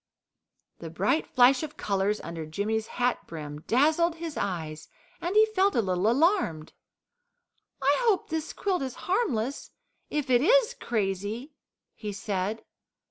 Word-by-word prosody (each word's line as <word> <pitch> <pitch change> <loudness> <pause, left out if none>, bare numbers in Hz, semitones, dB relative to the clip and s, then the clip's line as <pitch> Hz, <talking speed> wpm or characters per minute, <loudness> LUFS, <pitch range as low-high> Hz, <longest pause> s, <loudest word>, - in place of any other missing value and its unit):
The 165 - -7
bright 200 - 0
flash 255 0 +5
of 305 -2 -6
colours 200 +1 0
under 165 -1 -6
Jimmy's 215 +7 -2
hat 245 0 -1
brim 150 -2 -7
dazzled 315 +7 +3
his 330 -2 -6
eyes, 160 -5 -4 0.3
and 350 +4 -2
he 430 +1 +7
felt 400 -2 +1
a 235 - +4
little 185 +2 +1
alarmed. 270 - +1 1.1
"I 280 +2 +4
hope 405 -5 +2
this 320 0 -2
quilt 380 -5 -1
is 260 -2 -4
harmless 285 - -1 0.4
if 290 -3 -2
it 245 -1 +5
IS 480 - +4
crazy," 210 - -3 0.4
he 210 -2 -6
said. 200 +1 -3
240 Hz, 135 wpm, -27 LUFS, 195-320 Hz, 1.1 s, he